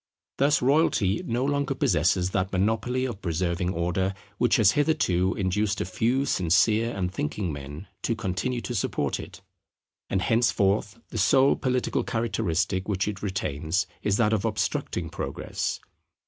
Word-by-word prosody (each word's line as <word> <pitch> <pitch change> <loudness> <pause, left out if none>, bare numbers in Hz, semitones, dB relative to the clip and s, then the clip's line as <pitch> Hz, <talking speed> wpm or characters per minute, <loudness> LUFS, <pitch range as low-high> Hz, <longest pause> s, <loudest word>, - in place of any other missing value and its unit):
Thus 140 0 +3
royalty 125 - +2
no 120 +3 0
longer 140 -1 0
possesses 90 -1 +2
that 95 0 -1
monopoly 110 +6 0
of 115 -6 -5
preserving 85 +1 -1
Order, 90 +3 -1 0.2
which 120 - +3
has 105 -3 +5
hitherto 120 - +1
induced 100 +2 0
a - - -1
few 120 +9 0
sincere 105 - +2
and 90 -1 -2
thinking 85 +1 -2
men 70 +5 -8 0.2
to 115 - 0
continue 110 +5 -2
to 120 - -4
support 110 - -1
it; - - -10 0.7
and 95 -1 0
henceforth 105 -3 +2
the 110 - -4
sole 130 +7 +4
political 125 -1 0
characteristic 100 -5 -1
which 95 -1 0
it 105 -2 -4
retains 85 -4 -1 0.2
is 100 -1 +1
that 110 -2 +3
of 105 -3 0
obstructing 110 -2 -1
Progress. - - -3
100 Hz, 145 wpm, -26 LUFS, 90-120 Hz, 0.7 s, has